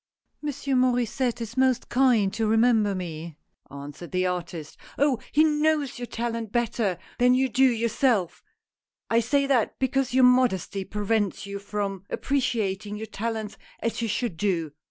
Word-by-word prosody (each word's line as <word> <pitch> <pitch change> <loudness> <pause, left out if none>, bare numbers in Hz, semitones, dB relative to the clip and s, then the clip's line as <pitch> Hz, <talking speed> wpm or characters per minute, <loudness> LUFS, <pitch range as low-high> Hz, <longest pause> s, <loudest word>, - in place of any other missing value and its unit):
" - - -51
Monsieur 285 -2 -3
Maur^sset 245 -1 +1
is 230 0 -6
most 260 -2 +2
kind 240 -6 +3
to 225 -1 0
remember 220 -2 +3
me," 165 -3 -6 0.3
answered 145 +4 -9
the 185 0 +1
artist. 175 -4 -4
" - - -22
Oh! 280 -4 +2
he 305 - +5
knows 300 -3 +1
your 245 - -5
talent 230 -2 -3
better 230 -5 0 0.2
than 250 +1 +5
you 265 +1 +2
do 260 +2 +2
your 235 -2 +2
self. 220 -6 +1 0.7
I 230 - +5
say 280 +5 +1
that, 265 -5 +1
because 265 0 0
your 260 +1 +4
modesty 245 -6 +3
prevents 210 -1 -1
you 200 0 -5
from 200 -2 -4
appreciating 210 -7 -1
your 220 - -5
talents 220 0 -4 0.2
as 230 +1 -2
you 230 - 0
should 225 -4 -2
do. 170 -5 0
230 Hz, 160 wpm, -26 LUFS, 200-255 Hz, 0.7 s, he